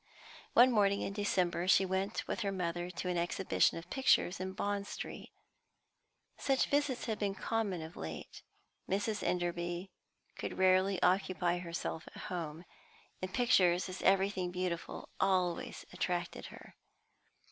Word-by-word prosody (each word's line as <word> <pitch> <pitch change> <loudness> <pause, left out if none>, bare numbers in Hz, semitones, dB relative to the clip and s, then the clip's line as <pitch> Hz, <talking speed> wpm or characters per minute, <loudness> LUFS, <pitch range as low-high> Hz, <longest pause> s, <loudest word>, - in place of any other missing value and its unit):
One 250 +2 +7
morning 200 -3 +3
in 195 - -3
December, 185 -4 0
she 190 +1 +6
went 190 +3 -2
with - - -2
her 200 -3 0
mother 175 -2 -2
to 180 +1 -5
an 180 -1 0
exhibition 175 +1 +2
of 170 +2 -9
pictures 265 -9 +3
in 190 0 -3
Bond 200 +1 -2
Street. - - -7 1.1
Such 270 -1 +2
visits 285 -3 0
had 220 -3 -2
been 200 -2 -1
common 205 -8 -1
of 160 +1 -9
late; 80 -1 -7 0.5
Mrs. 205 +2 0
Enderby 175 +1 -2 0.5
could - - -4
rarely 185 +1 +4
occupy 180 -1 +2
herself 170 -1 -4
at - - -8
home, 170 -1 -5 0.6
and 185 0 -3
pictures, 185 -7 +3
as 185 - -6
everything 195 -1 +2
beautiful, 180 -1 -4
always 185 -3 0
attracted 180 -1 -2
her. - - -13
185 Hz, 135 wpm, -34 LUFS, 175-200 Hz, 1.1 s, One